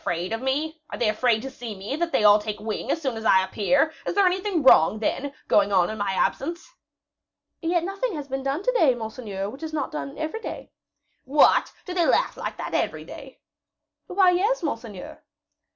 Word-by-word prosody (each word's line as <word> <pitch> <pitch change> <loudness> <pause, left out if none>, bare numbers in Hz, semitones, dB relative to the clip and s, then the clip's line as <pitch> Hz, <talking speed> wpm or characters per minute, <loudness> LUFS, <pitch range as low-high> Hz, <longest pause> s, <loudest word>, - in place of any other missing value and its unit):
Are 265 - -3
they 230 - +1
afraid 220 +1 +1
to 270 - -6
see 235 -4 -7
me, 200 +8 -5
that 340 0 -1
they 220 - +1
all 210 0 +7
take 210 0 -5
wing 215 0 -4
as - - +1
soon 265 -7 -3
as 220 - -6
I 190 -3 +5
appear? 225 +11 +1
Is - - -2
there 400 -1 +4
anything 370 -2 0
wrong, 215 -6 +6
then, 265 +6 -2 0.2
going 205 -1 +3
on 185 0 +3
in 220 - -7
my 200 -1 -1
absence?" 335 - -1 0.9
"Yet 340 0 +1
nothing 390 +3 -3
has 290 -2 -6
been 270 0 -3
done 275 +6 -2
to - - +2
day, 320 - +3
monseigneur, 220 -4 -5
which 270 - -12
is 320 -1 -6
not 305 - -2
done 280 -2 -6
every 315 +9 -4
day." - - -7 0.5
"What! 285 +3 +4
do 365 - -5
they 345 -2 +2
laugh - - +2
like - - -5
that - - -6
every - - -1
day?" - - -12 0.7
"Why, 370 -1 +4
yes, 400 +5 +1
monseigneur." 230 - -6
270 Hz, 195 wpm, -24 LUFS, 215-335 Hz, 0.9 s, all